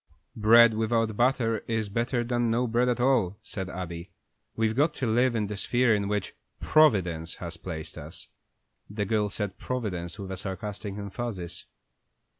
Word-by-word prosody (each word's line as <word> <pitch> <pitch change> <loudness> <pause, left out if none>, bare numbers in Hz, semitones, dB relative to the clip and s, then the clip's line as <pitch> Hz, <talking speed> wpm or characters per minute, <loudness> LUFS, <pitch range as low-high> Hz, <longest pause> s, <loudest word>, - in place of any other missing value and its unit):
"Bread 115 +1 +7
without 110 0 0
butter 120 -2 +2
is 110 -2 -1
better 120 +4 -1
than 120 -1 0
no 120 +2 +1
bread 120 +1 +2
at 125 - 0
all," 120 -7 +2
said 95 -2 -6
Abby. 85 -1 -6 0.5
"We've 110 -1 +1
got 150 +4 +2
to 130 - -2
live 120 +2 +2
in 110 -2 +1
the 105 +1 -4
sphere 120 +3 +2
in 100 -1 0
which 105 -2 -2 0.3
Providence 90 - +3
has 85 -1 -7
placed 80 -3 -7
us." - - -10 0.6
The 105 0 -2
girl 105 0 +1
said 100 -2 -4
"Providence" 90 -9 -3
with 95 -2 -6
a 95 - -4
sarcastic 100 +1 -5
emphasis. 100 -3 -5
110 Hz, 160 wpm, -27 LUFS, 95-120 Hz, 0.6 s, Bread